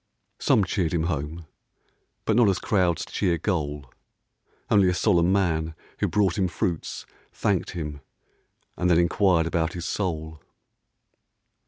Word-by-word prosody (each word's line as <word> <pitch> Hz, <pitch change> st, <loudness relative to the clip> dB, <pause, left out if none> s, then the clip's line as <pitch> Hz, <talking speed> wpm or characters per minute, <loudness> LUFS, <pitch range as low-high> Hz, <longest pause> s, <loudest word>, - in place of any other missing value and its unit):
Some 105 Hz, -, +3 dB
cheered 90 Hz, -3 st, -1 dB
him 80 Hz, -, +1 dB
home, 80 Hz, 0 st, -3 dB, 0.8 s
but 110 Hz, -, +2 dB
not 120 Hz, -3 st, +5 dB
as 95 Hz, -, +1 dB
crowds 90 Hz, -6 st, +1 dB
cheer 90 Hz, -4 st, 0 dB
Goal. 75 Hz, -7 st, -3 dB, 0.7 s
Only 100 Hz, -3 st, +4 dB
a 90 Hz, -, 0 dB
solemn 90 Hz, -2 st, +3 dB
man 80 Hz, -5 st, 0 dB, 0.2 s
who -, -, +1 dB
brought 100 Hz, -3 st, +1 dB
him 95 Hz, -, +2 dB
fruits 90 Hz, -1 st, -3 dB, 0.3 s
Thanked -, -, -1 dB
him; 75 Hz, -3 st, -5 dB, 0.7 s
and 90 Hz, -, 0 dB
then 85 Hz, -, +5 dB
enquired 85 Hz, 0 st, +3 dB
about 85 Hz, -1 st, -1 dB
his 85 Hz, -1 st, -5 dB
soul. 80 Hz, -5 st, -3 dB
85 Hz, 135 wpm, -25 LUFS, 80-95 Hz, 0.8 s, not